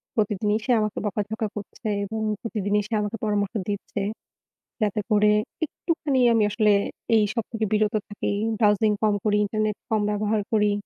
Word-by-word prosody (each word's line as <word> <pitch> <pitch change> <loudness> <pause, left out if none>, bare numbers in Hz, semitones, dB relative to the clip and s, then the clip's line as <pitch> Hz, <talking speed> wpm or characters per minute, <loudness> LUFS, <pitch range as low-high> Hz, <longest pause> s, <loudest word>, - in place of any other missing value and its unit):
প্রতিদিনই 210 0 +1
সে 255 - +1
আমাকে 215 0 -2
বকাঝকা 210 +2 -2
করছে 210 +2 -7 0.2
এবং 220 +2 -4 0.2
প্রতিদিন 210 -3 -2
সে 230 - -6
আমাকে 210 +2 -3
পরামর্শ 205 -1 0
দিচ্ছে 200 0 -3 0.8
যাতে 210 0 +1
করে 210 0 +5 0.3
একটুখানি 300 -4 -1
আমি 225 -1 +3
আসলে 210 0 +3 0.4
এই 215 - +5
সব 230 -3 -1
থেকে 225 -1 -1
বিরত 215 0 +2
থাকি, 205 - -2 0.3
ব্রাউসিং 210 0 +4
কম 215 -1 +3
করি, 210 -1 +3
ইন্টারনেট 215 0 -1
কম 220 -1 +2
ব্যবহার 210 +1 0
করি। 210 -1 +3
210 Hz, 155 wpm, -25 LUFS, 205-220 Hz, 0.8 s, করে